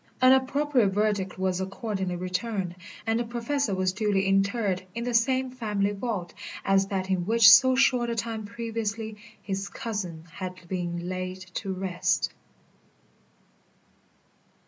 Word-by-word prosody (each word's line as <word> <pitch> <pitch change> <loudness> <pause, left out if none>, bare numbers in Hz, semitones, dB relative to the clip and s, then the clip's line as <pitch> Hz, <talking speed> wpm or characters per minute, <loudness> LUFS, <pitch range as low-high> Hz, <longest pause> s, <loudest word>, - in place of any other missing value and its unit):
An 255 0 +7
appropriate 265 -2 +2
verdict 200 -1 0
was 185 -1 0
accordingly 190 -1 -3
returned, 185 +1 -3 0.3
and 225 +1 +1
the - - +1
Professor 235 0 -1
was 185 0 0
duly 205 -2 +1
interred 195 0 +1
in 235 - -2
the 245 0 -2
same 255 +2 +2
family 210 -5 -1
vault 200 -5 -4 0.3
as 195 0 +3
that 190 -1 -2
in 185 -2 +1
which 225 0 +6
so 255 +3 +8
short 250 -2 +3
a 235 - -1
time 225 -1 -3
previously 225 -1 -4 0.3
his 195 0 -3
cousin 190 -10 -5
had 180 0 -7
been 175 -1 -3
laid 185 0 -3 0.2
to 195 0 -3
rest. 185 -1 0
205 Hz, 135 wpm, -27 LUFS, 185-230 Hz, 0.3 s, so